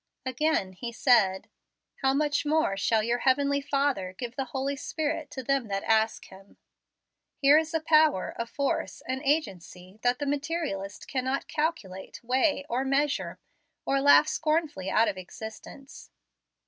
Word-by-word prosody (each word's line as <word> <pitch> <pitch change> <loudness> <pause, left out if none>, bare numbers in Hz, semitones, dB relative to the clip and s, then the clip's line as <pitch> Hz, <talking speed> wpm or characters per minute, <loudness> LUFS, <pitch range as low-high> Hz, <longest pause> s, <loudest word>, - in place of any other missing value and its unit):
Again 260 -7 0
He 235 +6 -6
said, 215 -6 +3 0.5
"How 265 -1 +2
much 295 +1 +1
more 300 -8 +1
shall 215 +3 +1
your 235 +2 0
Heavenly 280 +2 +2
Father 275 -10 -1
give 245 -1 -6
the 270 - -2
Holy 270 +1 -3
Spirit 300 +1 -3
to 265 - -7
them 275 -2 0
that 195 -1 -3
ask 220 0 +1
him." 195 +1 -16 0.8
Here 285 +2 +6
is 320 0 -4
a 325 - +1
power, 310 - +3
a 230 - -2
force, 280 +3 -2
an 260 +1 -2
agency, 195 - -3
that 245 0 +2
the 290 - -3
materialist 280 - -3
cannot 260 +1 -2
calculate, 300 - -3
weigh, 265 +4 +1
or 255 -1 -1
measure, 275 +2 0 0.5
or 275 0 +1
laugh 285 +2 +6
scornfully 305 - -1
out 225 - +3
of 190 - -2
existence. 220 +8 -10
265 Hz, 150 wpm, -27 LUFS, 220-290 Hz, 0.8 s, Here